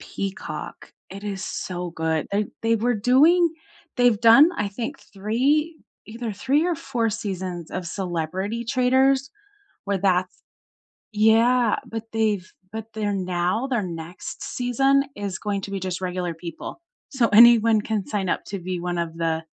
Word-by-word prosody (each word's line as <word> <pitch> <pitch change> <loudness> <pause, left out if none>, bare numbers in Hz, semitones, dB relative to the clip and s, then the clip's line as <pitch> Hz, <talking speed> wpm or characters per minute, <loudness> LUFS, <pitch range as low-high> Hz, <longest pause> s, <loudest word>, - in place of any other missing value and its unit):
Peacock, 195 0 -6 0.2
it 200 +1 -9
is 200 -1 -4
so 180 -1 -4
good, 160 -1 -1
they 205 0 +1 0.2
they 230 0 +2
were 240 +3 +1
doing 300 - +4 0.5
they've 245 -3 +3
done, 235 +8 +7
I 205 - 0
think, 235 +8 -5
3 270 +11 0 0.3
either 230 0 -5
3 275 - +1
or 350 - +1
4 235 -5 -1
seasons 185 -5 -5
of 185 -2 -4
Celebrity 185 +5 -3
Traitors, 265 +2 +2 0.6
where 200 -1 0
that's 185 -1 0 0.7
yeah, 225 +2 +4
but 225 -1 -5
they've 210 -4 0 0.2
but 220 0 -5
they're 215 -2 -1
now 185 +6 -1
their 240 -6 0
next 170 0 -7
season 270 +3 +2
is 200 -2 -4
going 205 -1 -2
to 195 - -7
be 195 - -2
just 185 -1 -3
regular 180 -2 -2
people, 165 - -8 0.3
so 250 -4 +2
anyone 230 -1 +7
can 210 -3 -2
sign 195 -4 -2
up - - -1
to 195 -1 -5
be 180 0 -4
one 175 0 -3
of 165 -1 -4
the 165 -1 -1
210 Hz, 155 wpm, -23 LUFS, 185-240 Hz, 0.7 s, done